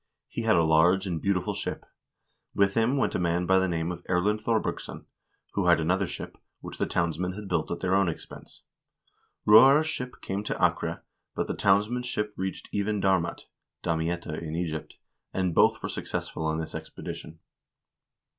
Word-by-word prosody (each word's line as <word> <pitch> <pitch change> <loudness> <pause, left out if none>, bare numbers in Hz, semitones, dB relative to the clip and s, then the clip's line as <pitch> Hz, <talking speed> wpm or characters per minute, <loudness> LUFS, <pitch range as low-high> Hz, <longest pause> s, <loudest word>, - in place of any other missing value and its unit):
He - - -4
had 110 -1 +3
a 85 - +4
large 85 +5 +4
and 85 -4 -3
beautiful 95 -2 0
ship. - - -5 0.7
With 100 -1 +3
him 115 +5 +2
went - - +1
a - - 0
man 85 0 +1
by 95 +1 +3
name 85 0 -1
of 90 0 -7
Erlend 100 +4 +1
Thorbergsson, 115 -1 -2 0.5
who 100 -3 0
had 85 -1 +6
an 80 +2 +1
other 95 +1 +1
ship, - - -8 0.2
which - - -9
the - - +1
townsmen 85 +1 -1
had 105 +1 -7
built 85 -4 -1
at 85 - -4
their 95 0 +1
own 95 -2 +3
expense.2 85 - -9
Roar's 135 +8 +8
ship 125 -5 -4
came 100 +2 -3
to - - -1
Acre, - - 0 0.3
but - - 0
the - - -3
townsmen's 105 +6 +2
ship 105 -3 -2
reached 95 0 -4
even 105 +1 0
Darmat 95 -3 +1 0.4
(Damietta 85 -1 -2
in 80 -1 -5
Egypt), 80 -2 -4 0.4
and 95 -2 0
both - - +4
were - - -1
successful 80 - -4
on 80 0 0
this 80 -1 -5
expedition." 80 +1 -7
95 Hz, 175 wpm, -27 LUFS, 85-105 Hz, 0.7 s, Roar's